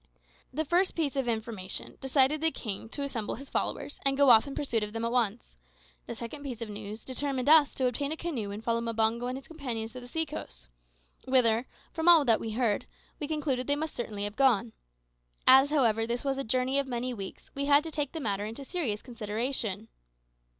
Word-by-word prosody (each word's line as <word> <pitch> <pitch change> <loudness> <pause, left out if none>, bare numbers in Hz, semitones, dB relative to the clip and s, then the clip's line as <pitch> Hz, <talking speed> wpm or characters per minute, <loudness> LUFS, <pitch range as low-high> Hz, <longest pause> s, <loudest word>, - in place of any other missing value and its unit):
The 310 +4 -2
first 355 +5 +2
piece 305 -5 -1
of 270 -3 -1
information 220 -4 -3
decided 270 +2 +2
the 320 - +3
king 220 -6 -5
to 285 - -3
assemble 240 -6 -3
his 275 +3 -11
followers, - - -2
and 275 0 +2
go 280 -2 +7
off 225 +3 +7
in 275 - -6
pursuit 240 -6 -1
of 210 0 -4
them 225 0 -2
at 230 - -1
once; 235 - -1 0.5
the - - -5
second 235 +5 -7
piece 260 -5 -6
of 230 -2 -5
news 210 +1 -7
determined 265 0 -2
us 305 -1 +7
to 260 - 0
obtain 275 +4 -1
a 315 - -2
canoe 270 -13 -3
and 205 +2 -6
follow 230 0 0
Mbango 230 +1 0
and 255 - -3
his 270 - -11
companions 245 -8 -4
to 255 - -8
the 245 - -11
sea 320 +6 0
coast, - - -9 0.6
whither, 245 -2 +3 0.3
from 325 +1 +2
all 325 -4 +7
that 230 -3 +4
we 220 -1 -4
heard, 225 -3 0 0.3
we 295 - -3
concluded 285 -5 -1
they 285 - +3
must 310 +1 -4
certainly 210 -4 -4
have 205 0 -3
gone. 240 -4 +3 0.7
As 265 +2 +8
this, 305 - -1
however, 225 -4 +3 0.2
was 275 -1 -1
a - - -1
journey 255 +3 +1
of 275 - -1
many 250 0 -2
weeks, 195 -4 -8
we 280 0 -2
had 285 +1 +5
to 325 - -6
take 290 -2 -2
the 325 - -5
matter 205 -7 -1
into 225 +6 -7
serious 265 - -2
consideration. 225 -2 -3
250 Hz, 215 wpm, -29 LUFS, 225-280 Hz, 0.7 s, As